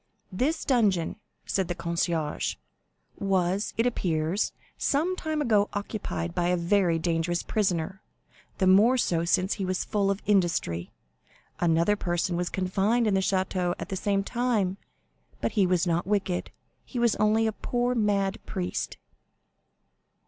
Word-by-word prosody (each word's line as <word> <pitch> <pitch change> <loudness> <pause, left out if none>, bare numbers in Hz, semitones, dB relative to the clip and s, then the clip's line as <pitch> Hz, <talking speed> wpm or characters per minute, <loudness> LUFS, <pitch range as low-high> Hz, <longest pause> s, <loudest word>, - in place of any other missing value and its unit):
"This 280 - -1
dungeon," 205 - +2 0.3
said 190 -2 0
the 175 - -3
concierge, 170 -2 -1 0.6
"was, 190 0 0
it 230 - +2
appears, 175 -5 0 0.2
some 320 +6 +1
time 315 -4 -2
ago 210 -5 +3
occupied 140 - -3
by 175 - 0
a 180 0 +2
very 175 -1 +2
dangerous 165 +1 0
prisoner, 190 -2 -1 0.6
the 190 - +1
more 210 +7 +6
so 170 -8 +1
since 185 +3 +2
he 200 - -4
was 185 0 -1
full 200 -2 +1
of 200 0 -2
industry. 170 - +1 0.7
Another 170 +4 +3
person 175 -2 -1
was 175 0 -1
confined 195 +5 +1
in 210 - +2
the 190 - +3
Château 185 -2 0
at 170 - -6
the 195 - -2
same 195 +1 0
time, 220 -5 0 0.6
but 115 - -1
he 195 -3 +3
was 180 0 +2
not 170 +1 0
wicked, 195 -3 0 0.3
he 255 - -8
was 235 -2 +3
only 215 +1 +3
a 220 - +2
poor 245 +3 -1
mad 205 -3 0
priest." 185 -3 -3
190 Hz, 145 wpm, -27 LUFS, 175-210 Hz, 0.7 s, more